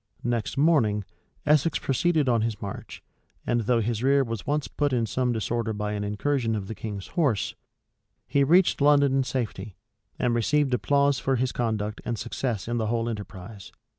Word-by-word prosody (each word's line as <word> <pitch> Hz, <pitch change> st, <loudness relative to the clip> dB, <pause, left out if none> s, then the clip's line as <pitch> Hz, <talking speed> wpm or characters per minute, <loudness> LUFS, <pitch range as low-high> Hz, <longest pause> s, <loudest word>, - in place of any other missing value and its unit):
Next 120 Hz, -1 st, -2 dB
morning, 130 Hz, -10 st, +3 dB, 0.4 s
Essex 150 Hz, +1 st, +3 dB
proceeded 155 Hz, +2 st, +1 dB
on 120 Hz, -3 st, +3 dB
his 110 Hz, -2 st, -2 dB
march; 100 Hz, -1 st, -7 dB, 0.4 s
and 120 Hz, 0 st, +1 dB
though 115 Hz, +1 st, +2 dB
his 115 Hz, 0 st, -1 dB
rear 135 Hz, +1 st, +4 dB
was 115 Hz, -4 st, -5 dB
once 150 Hz, 0 st, 0 dB
put 145 Hz, -2 st, -1 dB
in 120 Hz, -2 st, +1 dB
some 125 Hz, +4 st, 0 dB
disorder 115 Hz, 0 st, -1 dB
by 105 Hz, 0 st, -3 dB
an 105 Hz, -1 st, -2 dB
incursion 115 Hz, +3 st, 0 dB
of 100 Hz, -2 st, -4 dB
the 110 Hz, -, -4 dB
king's 105 Hz, -3 st, -6 dB
horse, 135 Hz, -, 0 dB, 0.7 s
he 140 Hz, -, +2 dB
reached 175 Hz, +2 st, +4 dB
London 140 Hz, -2 st, +4 dB
in 135 Hz, -, +3 dB
safety, 110 Hz, -6 st, -4 dB, 0.4 s
and 120 Hz, -1 st, +1 dB
received 135 Hz, +4 st, +1 dB
applause 140 Hz, +2 st, +2 dB
for 135 Hz, -, 0 dB
his 125 Hz, 0 st, 0 dB
conduct 110 Hz, -3 st, -2 dB
and 120 Hz, -1 st, -3 dB
success 120 Hz, -3 st, -3 dB
in 120 Hz, 0 st, -1 dB
the 110 Hz, -2 st, -1 dB
whole 115 Hz, +1 st, 0 dB
enterprise. 105 Hz, -2 st, -7 dB
120 Hz, 175 wpm, -26 LUFS, 110-140 Hz, 0.7 s, rear